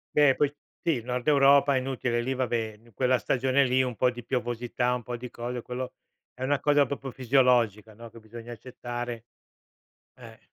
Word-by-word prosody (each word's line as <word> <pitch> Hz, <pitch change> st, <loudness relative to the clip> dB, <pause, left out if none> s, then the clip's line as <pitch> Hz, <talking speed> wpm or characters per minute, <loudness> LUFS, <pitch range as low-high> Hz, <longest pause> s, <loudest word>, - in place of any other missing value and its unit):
Beh, 145 Hz, -3 st, +5 dB
poi 145 Hz, -1 st, +1 dB, 0.3 s
sì, 155 Hz, -9 st, +1 dB
nord 125 Hz, +3 st, -4 dB
Europa 140 Hz, -1 st, +5 dB
è 130 Hz, -, +2 dB
inutile, 125 Hz, -2 st, -1 dB
lì, 130 Hz, +2 st, -2 dB
vabbè, 115 Hz, -4 st, -2 dB
quella 130 Hz, +1 st, +2 dB
stagione 130 Hz, +4 st, +2 dB
lì, 130 Hz, +1 st, +3 dB
un 125 Hz, -3 st, -2 dB
po' 125 Hz, +2 st, +2 dB
di 120 Hz, -1 st, -9 dB
piovosità, 120 Hz, 0 st, -1 dB
un 125 Hz, -, -2 dB
po' 120 Hz, +1 st, -5 dB
di 125 Hz, 0 st, -8 dB
cose. 120 Hz, 0 st, -5 dB
Quello 125 Hz, +1 st, -5 dB, 0.4 s
è 130 Hz, -, -6 dB
una 140 Hz, +1 st, +1 dB
cosa 145 Hz, -1 st, +4 dB
proprio 135 Hz, 0 st, -5 dB
fisiologica, 120 Hz, -4 st, +2 dB
no, 115 Hz, 0 st, -11 dB
che 115 Hz, -, -13 dB
bisogna 115 Hz, +2 st, -10 dB
accettare. 120 Hz, 0 st, -6 dB, 0.9 s
Eh. -, -, -14 dB
125 Hz, 175 wpm, -27 LUFS, 120-130 Hz, 0.9 s, Beh